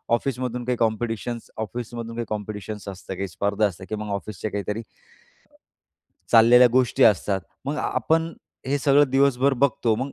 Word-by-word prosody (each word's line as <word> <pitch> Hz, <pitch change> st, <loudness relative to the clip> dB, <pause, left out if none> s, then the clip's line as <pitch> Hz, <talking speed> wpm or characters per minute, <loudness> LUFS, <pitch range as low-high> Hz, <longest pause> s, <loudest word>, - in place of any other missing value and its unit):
ऑफिसमधून 125 Hz, -1 st, -3 dB
काही 125 Hz, 0 st, 0 dB
कॉम्पिटिशन्स 115 Hz, +1 st, -2 dB
ऑफिसमधून 115 Hz, +1 st, -5 dB
काही 120 Hz, 0 st, -3 dB
कॉम्पिटिशन्स 105 Hz, -1 st, -5 dB
असतं 95 Hz, 0 st, -7 dB
काही 95 Hz, +2 st, -3 dB
स्पर्धा 100 Hz, +3 st, 0 dB
असते 95 Hz, -1 st, -9 dB
किंवा 105 Hz, 0 st, -4 dB
मग 105 Hz, -, -5 dB
ऑफिसच्या 100 Hz, +1 st, -5 dB
काहीतरी 105 Hz, +2 st, -3 dB, 1.5 s
चाललेल्या 120 Hz, +2 st, +7 dB
गोष्टी 125 Hz, -3 st, +2 dB
असतात. 100 Hz, 0 st, +3 dB, 0.2 s
मग 145 Hz, +2 st, -2 dB
आपण 165 Hz, +1 st, 0 dB, 0.3 s
हे 140 Hz, +2 st, +1 dB
सगळं 140 Hz, 0 st, +4 dB
दिवसभर 135 Hz, 0 st, +3 dB
बघतो 120 Hz, -4 st, +2 dB
मग 135 Hz, +4 st, -4 dB
115 Hz, 140 wpm, -24 LUFS, 105-130 Hz, 1.5 s, चाललेल्या